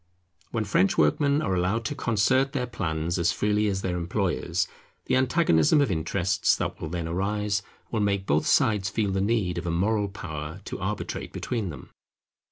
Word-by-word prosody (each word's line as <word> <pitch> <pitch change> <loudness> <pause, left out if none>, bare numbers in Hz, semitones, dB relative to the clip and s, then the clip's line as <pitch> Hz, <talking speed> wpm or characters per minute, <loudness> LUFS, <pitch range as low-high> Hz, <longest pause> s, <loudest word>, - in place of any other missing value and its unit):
When 110 -2 -2
French 95 -1 +2
workmen 140 - +3
are 95 - 0
allowed 95 +6 0
to - - -1
concert 130 +5 +2
their 130 -4 0
plans 85 -7 -2
as 85 0 +3
freely 105 +3 +1
as 95 -1 -1
their 90 -1 -1
employers, 90 -1 -1 0.4
the - - +1
antagonism 130 - +4
of 140 -7 +2
interests 90 +3 +1
that - - -4
will 80 - -4
then 85 -1 -3
arise 100 +3 -1 0.3
will 115 - 0
make 100 -2 +1
both 75 -3 +1
sides 105 -3 +3
feel 100 -1 0
the 95 0 0
need 100 -5 0
of 85 - -6
a - - +1
moral 100 +5 +1
power 80 -3 -6
to - - -5
arbitrate 95 +2 -4
between 115 -6 -3
them. 70 -5 -10
100 Hz, 175 wpm, -26 LUFS, 85-110 Hz, 0.4 s, antagonism